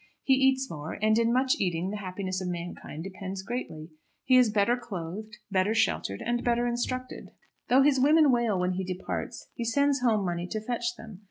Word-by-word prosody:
He 270 - +4
eats 265 0 +3
more; 155 - -6
and 215 +1 +3
in 230 0 +2
much 255 +2 +2
eating 180 0 -1
the 210 - -4
happiness 185 -1 -4
of 185 - -3
mankind 170 -3 -6
depends 190 0 -6
greatly. 170 -9 -5 0.3
He 255 - +4
is 250 -3 +6
better 210 +3 +2
clothed, 210 -2 -7
better 190 +3 +2
sheltered, 100 - 0
and 240 0 0
better 240 0 +1
instructed. 250 +1 -3 0.4
Though 265 +2 +6
his 280 -2 +4
women 300 +2 +5
wail 235 -6 +1
when 180 0 +1
he 185 +1 -2
departs, 185 0 -5
he 235 - -4
sends 280 +3 +2
home 220 -5 +2
money 175 0 -2
to 215 - -3
fetch 240 +2 -2
them. 220 -5 -11
215 Hz, 190 wpm, -28 LUFS, 185-245 Hz, 0.4 s, is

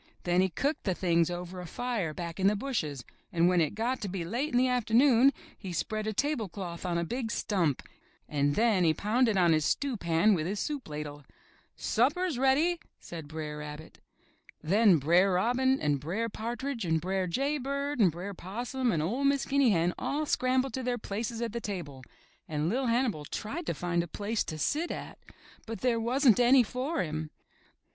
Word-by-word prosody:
Then 175 +1 +3
he 190 - +2
cooked 280 - -2
the 190 -3 +1
things 170 -2 +2
over 180 +1 -5
a 180 - -8
fire 230 -5 -2
back 170 +2 -6
in 190 - +4
the 210 - +3
bushes, 160 - -3 0.3
and 170 0 +3
when 180 -1 +4
it 160 +4 0
got 240 +4 -1
to 205 - -3
be 180 -2 -4
late 245 - -2
in 245 - +2
the 255 +1 +4
afternoon 250 +2 +4 0.2
he 190 -3 -7
spread 215 +5 -2
a - - 0
tablecloth 205 - -3
on 170 -1 0
a 170 - 0
big 235 +6 -3
stump 180 - 0 0.4
and 145 -1 +1
then 220 -5 +3
he 160 -2 +3
pounded 220 0 +2
on 175 -3 +5
his 155 -1 +2
stew 275 - 0
pan 170 +3 +3
with 165 -3 0
his 200 +2 -2
soup 290 - -4
ladle. 150 -1 -6 0.3
* - - -34
'Supper's 295 +5 +1
ready, 300 +7 +3 0.2
said 165 -3 -8
Br*er 150 -1 -5
Rabbit. 150 +1 -9 0.6
Then 195 +2 +5
Br*er 175 +7 +3
Robin 250 +7 +2
and 145 -2 +1
Br*er 195 +11 -2
Partridge 235 +3 -4
and 160 -2 +1
Br'er 185 +2 -1
Jay 275 - 0
Bird 280 +1 -2
and 190 -6 +5
Br'er 180 +5 -6
Possum 240 +7 -2
and 155 -3 0
01' 265 +8 0
Miss 280 -1 0
Guinea 275 -2 +3
Hen 175 -3 +2
all 300 +2 -1
scrambled 255 -1 +1
to 260 - -2
their 245 -1 -1
places 225 +2 -4
at 230 -2 -3
the 235 - -3
table 170 -11 -5 0.5
and 155 +1 -1
LiT 250 +4 0
Hannibal 230 - +1
tried 265 - -5
to - - -1
find 175 -1 0
a 170 - -5
place 210 +6 -2
to 155 - -5
sit 305 - 0
at, - - -7 0.5
but 225 0 -6
there 245 -2 +2
wasn't 245 +1 +3
any 250 +1 +6
for 260 +8 -2
him. 155 -1 -4
210 Hz, 195 wpm, -29 LUFS, 170-255 Hz, 0.6 s, any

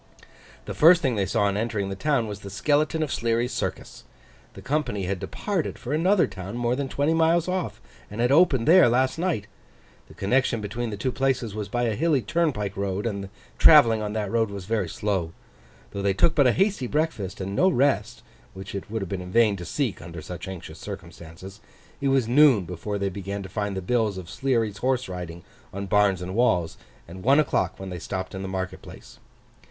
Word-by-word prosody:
The - - -5
first 170 +2 +6
thing 130 -4 +1
they 100 -2 0
saw 115 +2 +1
on 100 -1 +1
entering 105 -2 -2
the 95 - -4
town 135 +2 +1
was 105 -2 -6
the 100 - -9
skeleton 150 +9 +1
of 150 - -3
Sleary's 115 +1 0
Circus. - - -5 0.5
The - - -10
company 130 -8 -1
had 95 0 -2
departed 195 - -3
for 130 +3 -5
another 180 +5 +3
town 95 +4 -7
more 120 0 0
than 140 0 -3
twenty 145 +5 +1
miles 165 +1 +3
off, 185 0 -3 0.3
and 105 - -8
had 120 +2 +2
opened 140 -6 +4
there 175 -5 +7
last 130 +5 +1
night. 165 - -1 0.6
The - - -16
connection 125 +3 +1
between 110 +3 -4
the 105 - -5
two 125 +6 -1
places 130 -5 -1
was 105 -1 -5
by 120 0 -1
a 115 -2 +1
hilly 145 +1 +1
turnpike 150 - -1
road, 100 +1 -2
and 100 -4 -3
the - - -12 0.3
travelling 115 -9 +7
on 105 -1 -3
that 105 -3 -2
road 115 -2 +1
was 100 -2 -7
very 105 -4 -1
slow. 95 -4 -2 0.6
Though 100 - -4
they 100 -1 +1
took 160 - +3
but 140 -5 +4
a - - +5
hasty 190 - +1
breakfast, 145 - -2
and 95 +1 -4
no 185 - +4
rest 120 - 0 0.3
(which 95 0 -8
it 100 0 -6
would 110 -1 -3
have 95 - -7
been 95 -2 -3
in 90 0 -8
vain 110 -2 +4
to 90 - -7
seek 120 - -2
under 85 -2 -9
such 90 +3 -7
anxious 95 -3 -8
circumstances), 85 +4 -10 0.4
it 140 - 0
was 135 -4 +2
noon 130 -6 +5
before 90 +4 -4
they 100 -1 -1
began 100 +1 -5
to 95 - -9
find 100 0 -3
the 95 - -4
bills 110 -1 0
of 90 -2 -8
Sleary's 115 -6 0
Horse 130 +1 0
riding 90 -2 -7 0.3
on 100 +1 -5
barns 100 -2 +2
and 90 +1 -5
walls, 90 -8 +1 0.3
and 90 +3 -10
one 135 +8 +4
o'clock 150 - 0
when 95 -1 -7
they 90 - -5
stopped 95 +3 -5
in 95 - -5
the 95 - -4
market 95 -1 -4
place. - - -13
110 Hz, 210 wpm, -25 LUFS, 95-135 Hz, 0.6 s, there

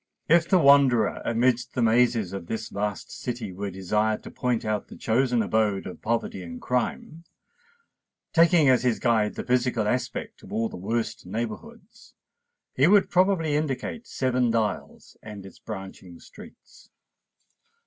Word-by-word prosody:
If 170 +1 +4
the 190 - +5
wanderer 140 -7 +4
amidst 120 +2 0
the 125 - 0
mazes 115 -4 +2
of 95 -3 -6
this 110 +2 -4
vast 105 0 -4
city 120 -6 -5
were 100 +2 -4
desired 105 +4 -1
to - - -9
point 125 -4 -1
out 110 -1 -2
the - - -12
chosen 120 0 +1
abode 105 -2 0
of 90 - -9
poverty 115 -4 -2
and 85 -1 -8
crime, 125 +6 -3 1.1
taking 165 -2 +5
as 130 -2 +4
his 125 -3 +1
guide 110 -3 +1
the - - -4
physical 125 -3 +1
aspect 125 +4 -3
of - - -14
all 115 0 -1
the - - -9
worst 110 +1 -3
neighbourhoods, 215 - -7 0.6
he 135 +4 +3
would 200 +1 +4
probably 180 -5 +2
indicate 150 - -3
Seven 130 -2 0
Dials 110 -3 -3
and 105 -3 -9
its 95 - -13
branching 95 -4 -9
streets. - - -16
115 Hz, 150 wpm, -25 LUFS, 105-135 Hz, 1.1 s, the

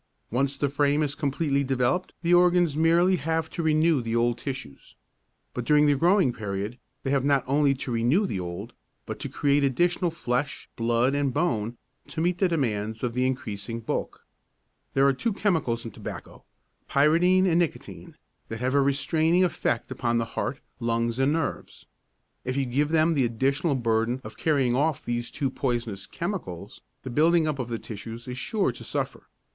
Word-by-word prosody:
Once 135 +3 0
the 145 - +1
frame 145 +2 +2
is 145 -1 -1
completely 140 -1 0
developed 130 +6 0
the 170 +1 +3
organs 175 -3 +4
merely 170 +4 +4
have 160 +1 -2
to - - -3
renew 155 -2 +3
the 115 0 -2
old 120 0 +2
tissues. 120 - -7 0.6
But 125 - -3
during 150 +4 +4
the 145 - +5
growing 170 -1 +3
period 105 +2 -4 0.2
they 135 - -1
have 140 -2 +2
not 140 -2 +3
only 140 +1 +3
to 130 -1 -5
renew 120 - +2
the 100 - -3
old 90 +6 -6 0.3
but - - -6
to - - -4
create 145 0 +2
additional 175 +6 +2
flesh, 140 -3 -2
blood 120 +3 +1
and 140 -1 +1
bone 120 -7 -1 0.3
to 160 - -6
meet 175 +2 +1
the 190 - +4
demands 110 -8 -1
of 120 -2 -1
the 125 +1 +1
increasing 115 -3 -4
bulk. 115 - -4 0.7
There 135 0 +4
are 140 - +5
two 220 - -1
chemicals 160 - 0
in 115 - -6
tobacco, - - -9 0.4
pyridine 170 +6 +4
and 170 -2 +3
nicotine, 170 -4 -4 0.3
that 110 - -5
have 130 +2 0
a 140 - +4
restraining 155 +5 +2
effect 165 -9 -1
upon 120 -2 0
the 115 - 0
heart, 135 - -3 0.2
lungs 115 0 -1
and 135 +2 +3
nerves. 165 0 -4 0.6
If 130 +1 -3
you 135 - +1
give 140 +4 0
them 160 +1 +3
the 135 -5 +2
additional 135 +6 0
burden 115 0 0
of 110 0 -9
carrying 135 -6 +1
off 150 +2 0
these 120 0 -2
two 135 -3 -2
poisonous 120 -8 -2
chemicals, 125 - -5 0.2
the 130 - -6
building 160 +4 +3
up 150 -3 -2
of 125 -2 -3
the 115 - -2
tissues 115 +3 -8
is 125 +1 -5
sure 215 -4 0
to - - -11
suffer. - - -4
135 Hz, 180 wpm, -26 LUFS, 120-160 Hz, 0.7 s, the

